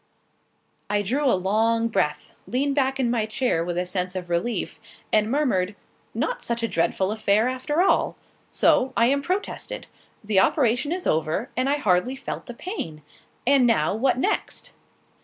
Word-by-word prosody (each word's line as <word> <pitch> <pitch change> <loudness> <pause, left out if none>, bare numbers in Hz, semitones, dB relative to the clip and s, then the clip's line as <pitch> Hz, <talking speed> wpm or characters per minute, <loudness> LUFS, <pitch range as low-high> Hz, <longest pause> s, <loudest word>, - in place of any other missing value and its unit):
I 205 0 +1
drew 265 +9 0
a - - +3
long 225 +5 +1
breath, 190 -9 -1
leaned 275 +3 0
back 270 -1 +1
in 240 -3 +1
my 225 -3 0
chair 220 -7 0
with 175 0 -3
a 180 - 0
sense 180 0 -3
of 180 -1 -5
relief, 180 +8 -1 0.3
and 215 0 +3
murmured 220 -9 +1 0.4
"Not - - -1
such 235 0 -2
a - - +2
dreadful 190 +1 0
affair, 215 +1 +2
after 295 +6 0
all. 390 - +2 0.3
So, 260 +1 +3
I 230 - +5
am 280 0 +1
protested! 370 +7 -3 0.4
The 205 -2 +3
operation 250 +5 +2
is 360 +1 -3
over, 160 - 0
and 255 +2 +1
I 285 - +3
hardly 210 +1 +1
felt 270 - -6
the 245 - -7
pain. 165 - -6 0.4
And 265 -1 +5
now 175 -10 +2
what 250 +4 +1
next?" 260 - -2
230 Hz, 165 wpm, -24 LUFS, 190-270 Hz, 0.4 s, I